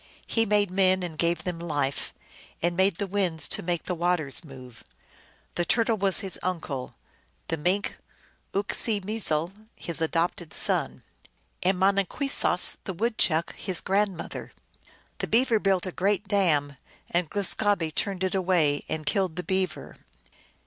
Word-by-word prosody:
He 225 Hz, -1 st, +1 dB
made 205 Hz, -2 st, +3 dB
men 185 Hz, -1 st, +3 dB
and 170 Hz, -3 st, -5 dB
gave 170 Hz, +2 st, +1 dB
them 175 Hz, -2 st, -3 dB
life, 145 Hz, -5 st, -2 dB, 0.5 s
and 175 Hz, +1 st, 0 dB
made 190 Hz, 0 st, +3 dB
the 200 Hz, -, -2 dB
winds 185 Hz, -5 st, 0 dB
to -, -, 0 dB
make 175 Hz, -1 st, -2 dB
the 180 Hz, -, -2 dB
waters 170 Hz, -4 st, 0 dB
move. 130 Hz, -5 st, -12 dB, 0.7 s
The 175 Hz, -, 0 dB
Turtle 225 Hz, +5 st, +2 dB
was 195 Hz, -1 st, +3 dB
his 195 Hz, -3 st, -3 dB
uncle; 160 Hz, -8 st, -3 dB, 0.5 s
the 165 Hz, -, 0 dB
Mink, 180 Hz, +7 st, 0 dB, 0.6 s
Uk 200 Hz, +1 st, 0 dB
see 220 Hz, -3 st, +2 dB
meezel, 185 Hz, -5 st, -1 dB, 0.2 s
his 170 Hz, -2 st, -3 dB
adopted 165 Hz, 0 st, -1 dB
son; -, -, -1 dB, 0.6 s
and 185 Hz, +1 st, +2 dB
Monin 195 Hz, +1 st, +3 dB
kwessos, 275 Hz, -10 st, +1 dB
the 190 Hz, -, -3 dB
Woodchuck, 180 Hz, -5 st, +1 dB
his 185 Hz, -3 st, 0 dB
grandmother. 195 Hz, -2 st, -1 dB, 0.7 s
The -, -, -2 dB
Beaver 230 Hz, -1 st, +3 dB
built 195 Hz, -2 st, +1 dB
a 185 Hz, -, -3 dB
great 200 Hz, +3 st, 0 dB
dam, 155 Hz, -9 st, +2 dB, 0.3 s
and 175 Hz, -2 st, +1 dB
Glus 200 Hz, -2 st, +2 dB
gahbe 200 Hz, -7 st, 0 dB
turned 190 Hz, +1 st, -1 dB
it 185 Hz, -, 0 dB
away 175 Hz, -6 st, +2 dB
and 155 Hz, -1 st, -2 dB
killed 185 Hz, -1 st, 0 dB
the 180 Hz, -, -3 dB
Beaver. 190 Hz, +2 st, -2 dB
180 Hz, 150 wpm, -27 LUFS, 165-200 Hz, 0.7 s, made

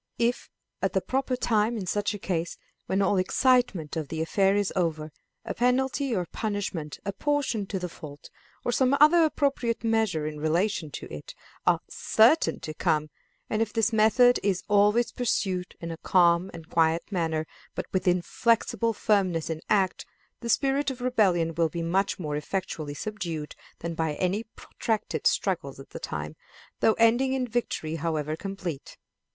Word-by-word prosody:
If, 240 Hz, +1 st, 0 dB, 0.3 s
at -, -, 0 dB
the -, -, +3 dB
proper 260 Hz, 0 st, -1 dB
time, 225 Hz, -1 st, +1 dB
in 200 Hz, -, -4 dB
such 205 Hz, +3 st, -1 dB
a -, -, -4 dB
case, 175 Hz, -3 st, -3 dB, 0.3 s
when 195 Hz, +1 st, +1 dB
all 195 Hz, -, +2 dB
the 190 Hz, -, +3 dB
excitement 230 Hz, -, +2 dB
of 155 Hz, -3 st, -3 dB
the 160 Hz, -, -5 dB
affair 195 Hz, +4 st, +2 dB
is 205 Hz, -2 st, 0 dB
over, 160 Hz, -4 st, -1 dB, 0.3 s
a -, -, -3 dB
penalty 260 Hz, +1 st, +1 dB
or 180 Hz, -2 st, -1 dB
punishment 195 Hz, -7 st, -4 dB
apportioned 230 Hz, -1 st, -1 dB
to 195 Hz, -, -2 dB
the 180 Hz, -1 st, -3 dB
fault, 145 Hz, -4 st, -11 dB, 0.3 s
or -, -, +1 dB
some 260 Hz, +3 st, +3 dB
other 320 Hz, +3 st, +7 dB
appropriate 275 Hz, -7 st, 0 dB
measures 215 Hz, -10 st, 0 dB
in 150 Hz, -, -9 dB
relation 165 Hz, +2 st, 0 dB
to -, -, -8 dB
it, 75 Hz, -, -8 dB, 0.3 s
are -, -, +4 dB
certain 235 Hz, +9 st, +3 dB
to 155 Hz, -, -5 dB
come, 155 Hz, 0 st, 0 dB, 0.4 s
and 215 Hz, -, -1 dB
if 225 Hz, -2 st, 0 dB
this 225 Hz, +1 st, +1 dB
method 235 Hz, +3 st, +5 dB
is 190 Hz, -2 st, 0 dB
always 210 Hz, +3 st, +3 dB
pursued 190 Hz, -7 st, -1 dB
in 170 Hz, 0 st, -5 dB
a 165 Hz, -, -6 dB
calm 175 Hz, +1 st, +3 dB
and 165 Hz, -2 st, -10 dB
quiet 165 Hz, +2 st, +1 dB
manner 160 Hz, -4 st, -1 dB, 0.3 s
but -, -, -3 dB
with 185 Hz, 0 st, 0 dB
inflexible 230 Hz, +5 st, +1 dB
firmness 190 Hz, -7 st, +1 dB
in 160 Hz, 0 st, -4 dB
act, 195 Hz, -3 st, +1 dB, 0.3 s
the 235 Hz, -, -6 dB
spirit 275 Hz, +4 st, +2 dB
of 260 Hz, -2 st, -6 dB
rebellion 190 Hz, -10 st, +2 dB
will 165 Hz, 0 st, +1 dB
be 170 Hz, +2 st, -4 dB
much 190 Hz, +4 st, 0 dB
more 150 Hz, -5 st, -3 dB
effectually 155 Hz, -2 st, -4 dB
subdued 170 Hz, -7 st, -5 dB, 0.2 s
than 170 Hz, 0 st, -4 dB
by 160 Hz, -2 st, -1 dB
any 190 Hz, +7 st, -1 dB
protracted 220 Hz, -2 st, -2 dB
struggles -, -, -1 dB
at -, -, -12 dB
the -, -, -7 dB
time, -, -, -5 dB, 0.4 s
though 220 Hz, -, +4 dB
ending 240 Hz, +4 st, +3 dB
in 260 Hz, -1 st, 0 dB
victory 215 Hz, -9 st, -2 dB
however 155 Hz, -2 st, -2 dB
complete. 180 Hz, -5 st, -6 dB
195 Hz, 170 wpm, -27 LUFS, 165-230 Hz, 0.4 s, other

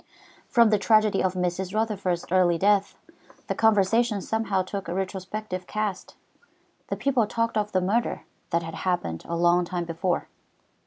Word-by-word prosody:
From 235 Hz, -3 st, +4 dB
the 210 Hz, -, +3 dB
tragedy 215 Hz, -1 st, +3 dB
of 185 Hz, 0 st, 0 dB
Mrs. 180 Hz, +2 st, -2 dB
Rutherford's 200 Hz, -5 st, -1 dB
early 180 Hz, -2 st, +4 dB
death, 200 Hz, +2 st, +2 dB, 0.5 s
the -, -, -2 dB
conversation 220 Hz, +1 st, +3 dB
somehow 205 Hz, -2 st, -1 dB
took 195 Hz, 0 st, -6 dB
a 170 Hz, -, -3 dB
retrospective 190 Hz, 0 st, -4 dB
cast, 215 Hz, -3 st, -3 dB, 0.7 s
and -, -, -3 dB
people 255 Hz, -6 st, +2 dB
talked 230 Hz, +1 st, -1 dB
of 210 Hz, -1 st, 0 dB
the 185 Hz, -, +1 dB
murder 215 Hz, +6 st, 0 dB, 0.3 s
that 170 Hz, 0 st, 0 dB
had 165 Hz, 0 st, -7 dB
happened 130 Hz, -, -1 dB
a 170 Hz, -, -2 dB
long 175 Hz, +1 st, +3 dB
time 175 Hz, 0 st, -3 dB
before. 170 Hz, +2 st, -2 dB
190 Hz, 155 wpm, -26 LUFS, 180-215 Hz, 0.7 s, From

